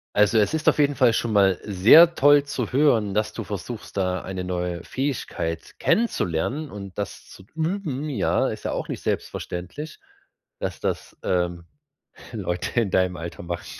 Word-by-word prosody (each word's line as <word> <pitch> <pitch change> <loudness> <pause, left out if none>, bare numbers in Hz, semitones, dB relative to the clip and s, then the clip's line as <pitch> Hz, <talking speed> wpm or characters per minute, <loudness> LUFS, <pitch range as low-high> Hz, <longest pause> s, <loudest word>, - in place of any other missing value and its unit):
Also, 105 +2 +4
es 105 +4 +3
ist 160 0 +3
auf - - 0
jeden 145 -1 +3
Fall 125 -4 +5
schon 110 0 -1
mal 95 -2 +4
sehr 115 - +7
toll 145 0 +5
zu 130 -5 -3
hören, 120 -8 +3
dass 105 +1 0
du 115 - -5
versuchst, 105 +2 -7
da 90 -1 0
eine 95 -1 -5
neue 90 -1 -3
Fähigkeit 130 - -3
kennenzulernen 145 - 0
und 100 -2 -9
das 100 -1 -5
zu - - -13
üben, 160 -4 -2
ja? 130 -10 +1
Ist - - -5
ja - - -2
auch - - -3
nicht - - -5
selbstverständlich, 115 - -4 0.6
dass - - -4
das, - - -4
ähm, 90 -1 -1 0.7
Leute 90 0 -2
in 105 -5 0
deinem 90 -1 +1
Alter 85 +1 -7
machen. 85 0 -5
105 Hz, 165 wpm, -24 LUFS, 90-140 Hz, 0.7 s, sehr